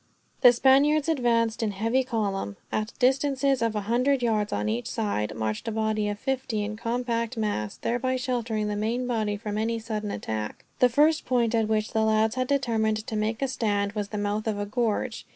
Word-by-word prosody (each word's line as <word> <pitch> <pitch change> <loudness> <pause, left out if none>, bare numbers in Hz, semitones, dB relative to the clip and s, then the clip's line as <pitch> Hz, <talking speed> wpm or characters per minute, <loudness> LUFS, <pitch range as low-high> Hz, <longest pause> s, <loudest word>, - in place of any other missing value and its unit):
The 245 - +9
Spaniards 275 +5 +4
advanced 235 -7 +1
in 220 - +1
heavy 225 +6 +1
column. 200 - -2
At 215 +1 -1
a - - -34
distance 270 +2 +1
of 240 -5 +2
a 210 - 0
hundred 250 +5 +1
yards, 215 -3 +1
on 105 +1 -1
each 115 +3 -2
side, 205 - -2
marched 110 - -3
a - - 0
body 215 -1 0
of 205 - -3
fifty 260 -3 -2
in 210 +1 -4
compact 235 +1 -2
mass, 205 - -2
thereby 255 +2 -1
sheltering 240 -4 -1
the 210 - -2
main 230 +4 -1
body 215 -4 -1
from 210 0 -4
any 230 +1 0
sudden 215 -2 -4
attack. 105 - -4
The 250 - +5
first 300 +5 +3
point 240 -3 +1
at 225 -2 +2
which 215 0 0
the 220 - +1
lads 220 0 +2
had 255 -1 -1
determined 220 -6 0
to 220 - -4
make 215 +4 -1
a - - +2
stand 205 -5 0
was 205 -1 -3
the 210 - -4
mouth 205 +1 -2
of 215 -2 0
a 205 - -2
gorge. 230 +2 -2
225 Hz, 205 wpm, -26 LUFS, 210-250 Hz, -, The